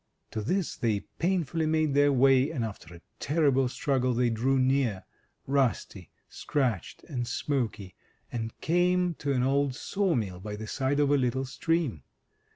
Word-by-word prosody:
To 110 - -3
this 185 - -1
they 110 -4 0 0.2
painfully 165 -3 0
made 155 -2 +1
their 145 0 +4
way, 135 +1 +4
and 135 -8 -2
after 90 -6 -9
a 85 - -14 0.2
terrible 140 -4 +2
struggle, 130 -2 0
they 120 0 +2
drew 130 +4 +1
near 130 -6 +1 0.2
— - - -47
rusty, 130 -9 -1 0.2
scratched, 125 - -2
and 125 -6 -4
smoky 120 -7 -2 0.2
— - - -40
and 115 -2 -5
came 180 +1 +2
to 145 - -1
an 125 -2 +1
old 135 0 +1
saw 195 +3 0
mill 95 -7 -2
by 105 +2 -6
the 110 +1 -7
side 135 +5 -1
of 145 -1 +3
a 145 - +5
little 130 0 0
stream. 150 - -1
135 Hz, 165 wpm, -28 LUFS, 115-145 Hz, 0.2 s, a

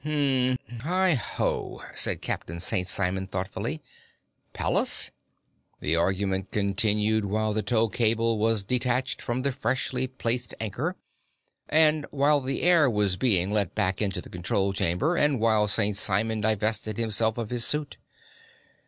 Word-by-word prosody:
"Hum, 135 -4 +1 0.2
hi, 180 +7 +2
ho," 125 - -3
said - - -1
Captain 85 +1 -4
St. 90 +1 -1
Simon 95 0 0
thoughtfully. 100 - -4 0.7
"Pallas?" - - +2 0.7
The 80 - +1
argument 95 +2 0
continued 105 +1 +1
while 110 +2 -1
the 110 - 0
tow 115 0 +1
cable 115 0 +1
was 110 -1 +2
detached 125 +3 -1
from 120 +2 -3
the 140 - 0
freshly 130 0 -1
placed 125 -2 -2
anchor, 130 - -3 0.7
and 155 -1 +3
while 145 +1 +2
the 135 +1 -3
air 170 -5 +5
was 105 -4 +1
being 95 -4 +1
let 105 -4 -1
back 95 -2 0
into 100 -3 -1
the - - -13
control 95 +2 0
chamber, 95 - 0
and 145 -5 +2
while 110 -2 +2
St. 105 0 +1
Simon 110 +2 0
divested 110 0 0
himself 110 0 +1
of 115 -2 -4
his 120 -1 +2
suit. 150 +2 -1
110 Hz, 140 wpm, -26 LUFS, 100-130 Hz, 0.7 s, air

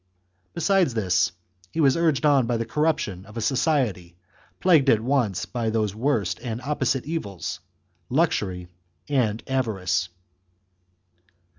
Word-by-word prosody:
Besides 175 - +2
this, 90 -6 +2 0.4
he - - -4
was 140 -4 +4
urged 160 -5 +1
on 140 -5 +4
by 120 -1 0
the 115 - -2
corrup 155 +5 +1
tion 95 -2 -5
of 105 +2 -11
a - - -1
society, 115 - 0 0.4
plagued 160 -7 +4
at 115 - +5
once 120 -5 0
by 115 -3 -2
those 110 -3 0
worst 110 - 0
and 120 -2 -4
opposite 135 -2 0
evils, 100 - -4 0.5
luxury 105 - 0 0.4
and 115 -6 0
avarice. 100 -8 -1
120 Hz, 130 wpm, -24 LUFS, 100-145 Hz, 0.5 s, at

